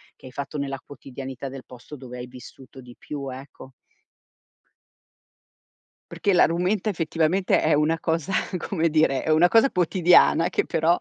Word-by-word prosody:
che - - -18
hai - - -11
fatto 140 +3 -6
nella 135 -1 -3
quotidianità 135 -1 -8
del 135 -1 -9
posto 125 +4 -12
dove 125 -1 -10
hai 125 0 -7
vissuto 130 +1 -14
di 125 -1 -14
più, 140 -2 -7
ecco. 130 0 -11 2.4
Perché 200 - 0
la 175 - +6
rumenta 180 +5 -1
effettivamente 165 +2 0
è 155 - +2
una 155 +2 +1
cosa 165 +2 -2 0.3
come 165 -2 -1
dire, 155 -3 +1
è - - -4
una 165 +3 +5
cosa 230 +7 +4
quotidiana 175 -1 +3
che - - 0
però 165 +2 +2
150 Hz, 155 wpm, -24 LUFS, 135-170 Hz, 2.4 s, la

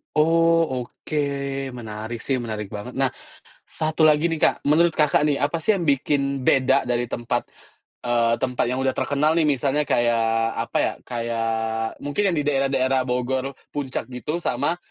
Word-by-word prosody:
Oh 165 -2 +3
oke, 155 - -7 0.6
menarik 110 0 -6
sih 135 -2 0
menarik 110 -4 -5
banget. 105 +4 -7
Nah 135 -1 +1 0.6
1 155 +1 -2
lagi 155 0 +5
nih 165 -2 -1
Kak, - - +2
menurut 160 +4 +4
Kakak 150 -1 +3
nih 140 - +1
apa 160 +3 -1
sih 215 +1 +2
yang 175 - -3
bikin 140 -1 +1
beda 130 -1 +3
dari 120 0 +1
tempat, 120 +1 -2 0.6
eee, 115 -1 +2
tempat 125 -2 -1
yang 125 - -1
udah 130 0 +1
terkenal 150 +4 +1
nih? 165 - +2
Misalnya 145 -1 +1
kayak 115 -1 +2 0.2
apa - - -2
ya, - - -1
kayak, 115 -1 -2
mungkin 165 +8 0
yang 170 - -1
di 145 - 0
daerah-daerah 135 -2 +1
Bogor, 130 +2 -1 0.2
Puncak 140 -3 -3
gitu 130 +6 -4
sama, 175 0 -1
135 Hz, 160 wpm, -23 LUFS, 120-150 Hz, 0.6 s, lagi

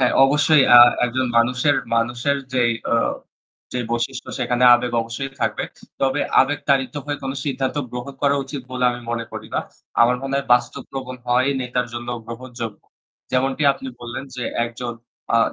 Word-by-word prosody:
হ্যাঁ, 125 - +3
অবশ্যই 145 +1 +4
আ - - +11 0.3
একজন 125 +1 0
মানুষের 125 +5 +2 0.2
মানুষের 120 +4 +1 0.2
যেই 120 -2 +2 0.2
আ - - +4 0.8
যে 125 - -2
বৈশিষ্ট্য 120 +2 -2
সেখানে 125 0 +1
আবেগ 120 0 -1
অবশ্যই 120 +4 -5
থাকবে। - - 0 0.4
তবে 135 -1 +1 0.2
আবেগ 145 +2 +1
তাড়িত 130 -2 +2
হয়ে 145 -1 -3
কোন 135 - -2
সিদ্ধান্ত 135 -1 -2
গ্রহণ 125 +3 -6
করা 140 0 +3
উচিত 135 0 -6
বলে 125 0 -1
আমি 120 0 -6
মনে 115 0 -2
করি - - -7
না। - - +2 0.4
আমার 125 +1 +4
মনে 135 0 -3
হয় 140 - -2
বাস্তব 120 0 -2
প্রবণ 130 -1 -6
হওয়াই 125 +3 +3
নেতার 125 -1 -1
জন্য 120 0 -6 0.2
গ্রহণযোগ্য। 120 -2 -7 0.5
যেমনটি 135 +3 +1
আপনি 135 - -8
বললেন 120 +2 -6
যে 125 - -4 0.2
একজন 120 +1 -5 0.4
আ - - +5
125 Hz, 165 wpm, -21 LUFS, 120-135 Hz, 0.8 s, আ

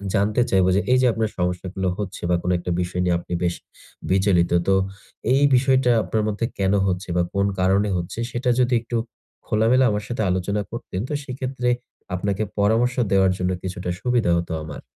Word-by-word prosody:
জানতে 105 +4 +2
চাইবো 95 -1 +3
যে, 100 - +3
এই 130 - +6
যে 130 - +4
আপনার 110 -1 -1
সমস্যাগুলো 90 +1 -2
হচ্ছে 105 -3 -5
বা 90 - +3
কোনো 90 +1 0
একটা 90 - -4
বিষয় 90 +1 -2
নিয়ে 90 -1 +2
আপনি 85 - -7
বেশ 85 0 +1 0.6
বিচলিত। 95 -3 +3 0.2
তো 95 - +4 0.6
এই 135 - +3
বিষয়টা 130 -1 +3
আপনার 110 -1 -1
মধ্যে 110 +2 -1
কেনো 100 +1 +2
হচ্ছে 90 0 -2
বা 85 - +3
কোন 100 0 +1
কারণে 95 +3 +2
হচ্ছে 85 +5 -5
সেটা 125 +1 -1
যদি 125 0 +2
একটু 120 0 -3 0.5
খোলামেলা 115 +4 +3
আমার 105 0 -2
সাথে 120 -2 -3
আলোচনা 95 +3 0
করতেন 105 -5 -5
তো - - -3
সেক্ষেত্রে 130 -1 -3 0.5
আপনাকে 100 +3 -1 0.2
পরামর্শ 115 +5 +2 0.2
দেওয়ার 95 -1 +4
জন্য 90 0 -1
কিছুটা 90 -1 -4
সুবিধা 120 -7 +1
হতো 85 -1 -3
আমার। 75 - -8
100 Hz, 180 wpm, -23 LUFS, 90-120 Hz, 0.6 s, এই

